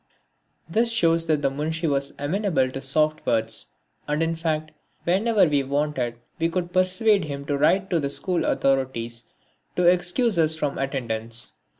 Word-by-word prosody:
This 230 +8 +1
shows 165 -7 +2
that 155 -2 +1
the 135 - +2
Munshi 160 +4 -3
was 140 -1 -1
amenable 155 -3 0
to 135 - -6
soft 155 +3 0
words; 110 -1 +1 0.4
and 150 +2 0
in 165 0 -1
fact, 155 -1 -2 0.3
whenever 205 +5 +3
we 145 -3 +1
wanted 135 -3 -2 0.2
we 165 +1 +1
could 175 0 -3
persuade 185 +1 +3
him 140 -1 -6
to 145 - -1
write 190 +7 +2
to 170 - +2
the 140 -2 -1
school 180 +5 -1
authorities 120 -4 -1 0.5
to 180 - +1
excuse 180 +4 +2
us 160 -1 +3
from 145 -3 -3
attendance. 115 -4 +1
155 Hz, 160 wpm, -24 LUFS, 135-175 Hz, 0.5 s, whenever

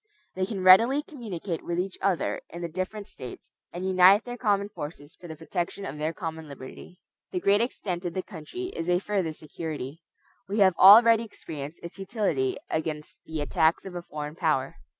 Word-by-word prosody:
They 185 0 -1
can 195 -4 -4
readily 230 +10 +7
communicate 205 - -6
with 170 - -3
each 185 +1 -2
other 190 -4 0
in 170 +1 -7
the - - -1
different 185 +5 -4
States, 130 - -10 0.2
and 180 +2 -5
unite 190 +2 +6
their 245 0 -5
common 205 -4 +1
forces 145 -5 -8
for 175 - -12
the 160 - -7
protection 175 +4 -4
of 150 -3 -6
their 155 +1 0
common 160 -1 -6
liberty. 140 +5 -11 0.3
The 365 - -1
great 205 - +3
extent 190 -7 -2
of 170 - -3
the 185 - -2
country 215 - -7
is 165 - -3
a 175 - +4
further 190 -3 -1
security. 155 -1 -6 0.5
We 205 - -2
have 190 -3 +5
already 225 +3 +9
experienced 155 -8 -8
its 170 +2 -9
utility 195 - -1
against 155 -1 -4
the 160 -1 -3
attacks 160 +3 +2
of 190 - -7
a 175 - -5
foreign 150 -2 -6
power. 155 - 0
180 Hz, 185 wpm, -27 LUFS, 160-200 Hz, 0.5 s, already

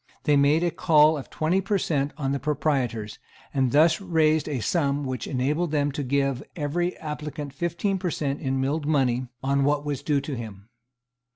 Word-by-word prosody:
They 150 - +3
made 145 +4 +4
a 175 - +1
call 155 -2 +4
of 140 - -7
twenty 170 +5 0
per 200 +1 0
cent. 145 -5 0
on 135 -3 -1
the 140 - -1
proprietors, 135 -8 -1 0.3
and 130 -3 +1
thus 160 +5 +4
raised 160 -4 +2
a 140 -4 -2
sum 145 +2 0
which 130 -3 -4
enabled 145 +6 0
them 145 -1 +1
to 145 +2 -4
give 135 -1 0
every 175 +4 -1
applicant 150 -2 -6
fifteen 175 +5 -1
per 180 -1 -1
cent. 140 -3 -2
in 135 -2 -1
milled 145 +3 -1
money 130 -4 +1 0.2
on 140 +1 +2
what 145 +1 +1
was 145 -2 -2
due 145 -1 +1
to 140 0 -5
him. 110 -3 -8
145 Hz, 185 wpm, -25 LUFS, 135-155 Hz, 0.3 s, made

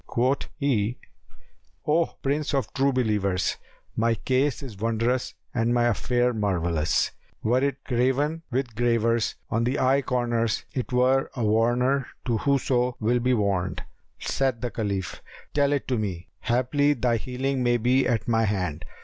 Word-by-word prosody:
Quoth 130 +4 0
he, 125 -6 0 0.9
"O 160 +2 +3 0.2
Prince 145 +1 0
of 135 - -1
True 140 0 +2
Believers, 105 -7 0 0.4
my 115 +1 +2
case 130 +3 0
is 110 -8 -9
wondrous 115 +3 0 0.2
and 120 0 +1
my 120 - +3
affair 120 +2 +1
marvellous; 85 -7 0 0.3
were 125 +4 +2
it 140 -1 -1
graven 135 +6 +1
with 130 -2 -2
gravers 115 -1 +1 0.2
on 115 +1 +1
the 125 +4 0
eye 135 +2 +3
corners 120 -3 0
it 130 -1 -3
were 130 +2 +3
a 120 -4 -1
warner 120 +5 +2 0.2
to 115 -4 0
whoso 125 -2 +1
will 120 +3 +2
be 125 +1 +2
warned." 95 -5 -1 0.3
Said 130 -4 -1
the 125 -2 -2
Caliph, 100 -5 -3 0.3
"Tell 140 -1 +2
it 145 -2 -1
to 125 -3 +1
me: 95 -5 -4
haply 130 +5 +2
thy 120 -3 +1
healing 130 +3 -2
may 120 -1 +3
be 125 +3 +2
at 115 -3 0
my 115 -1 +2
hand." 90 -7 -2
120 Hz, 150 wpm, -25 LUFS, 110-130 Hz, 0.9 s, O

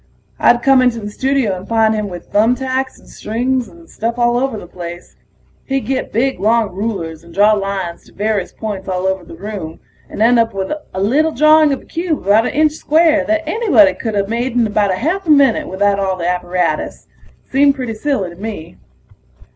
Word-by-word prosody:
I'd 240 0 +4
come 270 -1 +5
into 245 -2 +1
the 210 -1 -6
studio 265 -4 0
and 185 +1 -9
find 225 -1 +2
him 210 -2 -2
with 175 -1 -10
thumb 225 +4 +3
tacks 260 0 -3
and - - -20
strings 245 +3 -2
and 335 0 -16
stuff 230 +2 -4
all 240 0 +2
over 265 -3 -1
the - - -9
place. 175 0 -9 0.5
He'd 270 0 -1
get 265 0 -2
big 260 0 0
long 220 +1 +2
rulers 180 -6 -4
and 170 - -15
draw 205 +4 +4
lines 195 -4 -3
to - - -19
various 205 -2 -2
points 205 -3 -6
all 185 0 -2
over 190 -1 -1
the 165 - -12
room, 185 -3 -7 0.3
and - - -8
end 235 +1 +5
up 225 -2 +1
with 190 +4 -2 0.2
a - - -2
little 275 +11 +2
drawing 305 +1 +5
of 275 - -3
a - - -20
cube 330 - -3
about 215 +4 +4
an - - -4
inch 305 0 +3
square 315 +1 +2
that 320 0 -1
anybody 400 -10 +4
coulda 205 -4 -2
made 235 +3 -2
in 230 -4 0
a 200 -3 +2
half 340 - -2
a - - -2
minute 280 -5 +4
without 200 +1 +1
all 190 -1 -1
the 170 -1 -3
apparatus. 180 -1 -2 0.5
Seemed 280 +1 +4
pretty 250 -5 -4
silly 215 -6 -2
to - - -12
me. 205 -7 -7
225 Hz, 205 wpm, -17 LUFS, 195-270 Hz, 0.5 s, come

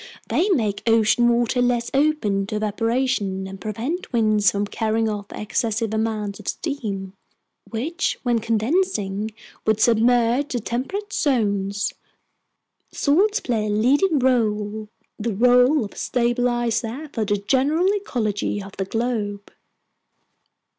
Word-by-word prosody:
They 380 +5 +2
make 220 - +1
ocean 225 +1 +4
water 240 +1 +2
less 240 -1 +1
open 270 -10 +1
to 215 - -4
evaporation 215 -2 -1
and 190 0 -9
prevent 240 - -4
winds 215 -4 +3
from 200 +1 -1
carrying 220 +1 0
off 205 -2 -4
excessive 220 +1 -2
amounts 215 -2 -2
of - - -12
steam, 205 - -4 0.6
which, 315 - -2
when 240 -2 +2
condensing, 220 - 0 0.3
would 220 -1 +1
submerge 240 +4 +3
the 245 - 0
temperate 330 - -4
zones. 205 -7 0 1.0
Salts 385 +9 +2
play 220 -4 -1
a - - -2
leading 275 - +3
role, 215 -4 0 0.3
the 220 -1 -2
role 250 +4 +4
of 200 - -11
stabilizer 240 +2 0
for 225 - -1
the 205 0 0
general 275 - +1
ecology 215 - -2
of 195 0 -8
the 195 - -1
globe!" 210 -2 -3
230 Hz, 120 wpm, -22 LUFS, 210-255 Hz, 1.0 s, ocean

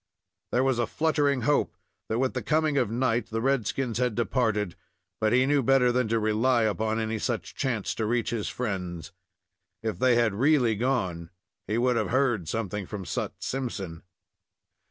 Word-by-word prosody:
There 125 - +2
was 130 -3 +1
a 120 - +1
fluttering 145 -4 +1
hope 145 +5 +1 0.3
that, 110 - 0
with 130 +1 +1
the - - -2
coming 155 -1 +1
of 125 -7 +2
night, 120 -1 0
the 115 - -2
red 130 -2 +1
skins 125 -4 -2
had 125 -3 +1
departed, 110 -6 0 0.4
but 110 -1 +2
he 125 +1 +4
knew 145 +1 +3
better 130 -1 +4
than 125 -1 +1
to 115 +1 +1
rely 115 +3 +2
upon 110 +1 0
any 110 0 -2
such 120 -1 -3
chance 120 -7 -1
to 110 - -2
reach 115 0 0
his 115 -3 -2
friends. 90 - -4 0.7
If 110 -2 -3
they 125 -1 +4
had 115 -3 +2
really 125 0 +3
gone, 95 -8 -1 0.4
he 110 - 0
would 125 0 +2
have - - 0
heard 120 - +1
something 105 -3 -3
from 100 -3 -6
Sut - - -3
Simpson. 100 -11 -4
115 Hz, 175 wpm, -27 LUFS, 110-130 Hz, 0.7 s, he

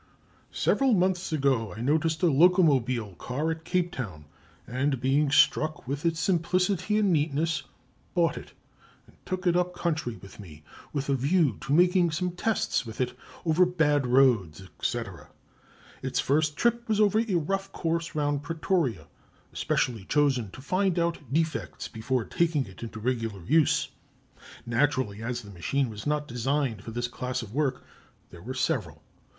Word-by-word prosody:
"Several 265 -4 +3
months 185 -1 +1
ago 135 -8 +1
I - - -5
noticed 155 +6 +1
a - - +6
locomobile 135 - +3
car 150 +6 -2
at 160 0 -5
Cape 175 +1 0
Town, 95 - -6 0.4
and 135 +2 -1
being 140 +4 +2
struck 155 -1 +3
with 145 +5 -1
its 165 -1 0
simplicity 185 +4 +1
and 205 -4 +3
neatness, 155 +1 0 0.5
bought 170 -3 +2
it - - -10 0.5
and - - -22
took 185 0 -3
it 175 -1 +3
up 180 0 0
country 160 -9 -2
with 100 +3 -14
me, 80 -6 -12 0.3
with 140 -1 -3
a 140 - +2
view 140 - +2
to - - -5
making 175 +1 +4
some 180 +3 -1
tests 180 - 0
with 115 -2 -9
it 125 -1 -1 0.3
over 165 +2 +4
bad 150 -6 +2
roads, 120 - +3 0.2
&c. - - 0 1.0
Its - - -1
first 150 +1 +1
trip 235 0 +1
was 215 -1 +2
over 215 0 +4
a 225 -5 0
rough 195 +4 -1
course 165 0 -2
round 145 -1 0
Pretoria, 160 - -1 0.5
especially 115 -6 -1
chosen 135 -7 +1
to 130 - -11
find 185 +3 +1
out 170 -6 -1
defects 160 +2 -1
before 115 +1 -2
taking 160 -5 +1
it 95 -2 -13
into 115 -1 -7
regular 115 -5 -2
use. 150 - +3 0.8
Naturally, 120 -3 0
as 120 +1 -3
the 105 - -11
machine 120 +8 -1
was 105 +5 -7
not 150 0 0
designed 125 -2 -1
for - - -8
this 120 +2 -2
class 125 +1 -4
of 105 -1 -10
work, 140 -2 -1 0.5
there 85 - -12
were 130 +7 -6
several. 135 +1 -2
145 Hz, 160 wpm, -27 LUFS, 125-170 Hz, 1.0 s, a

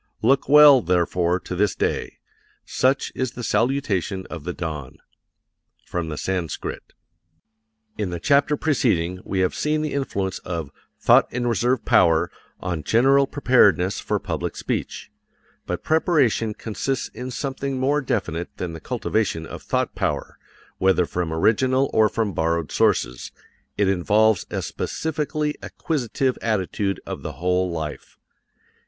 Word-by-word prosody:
Look 135 +5 +3
well, 145 -2 +8
therefore, 90 0 +1
to 90 - -6
this 105 +1 +1
day. - - -2 0.5
Such 135 +2 +1
is 130 -1 -2
the 120 - -7
salutation 105 -5 0
of 80 -4 -7
the 90 - -2
dawn. 75 -6 -6 0.9
From 85 -2 -3
the 75 - -5
Sanskrit. 90 -3 -4 1.1
In 105 -3 -1
the 85 -1 -4
chapter 140 - +3
preceding 90 - 0
we 95 -1 -1
have 90 - +1
seen 155 0 0
the 155 - -3
influence 100 -9 -2
of 85 -5 -5 0.3
"Thought - - +5
and 120 0 -2
Reserve 120 +1 +1
Power" 80 -1 +4 0.3
on 85 -3 -3
general 135 - +4
preparedness 105 -10 +3
for - - -1
public - - -4
speech. - - -4 0.6
But - - -3
preparation 140 - +2
consists 120 +4 -3
in 125 +1 -7
something 135 +1 -3
more 140 +3 +1
definite 90 - -2
than 90 -2 -4
the 80 - -7
cultivation 90 -7 -1
of - - -8
thought - - -1
power, - - -3 0.4
whether 95 -1 +3
from 85 -1 -3
original 130 +10 +2
or 110 -1 +4
from 110 -3 -1
borrowed 85 -1 -1
sources - - +1 0.5
it 100 - +2
involves 105 +2 +2
a - - -3
specifically 150 -1 -2
acquisitive 130 -3 -2
attitude 100 -2 -1
of - - -6
the - - -5
whole 90 +4 0
life. 80 -3 -6
105 Hz, 135 wpm, -23 LUFS, 90-130 Hz, 1.1 s, well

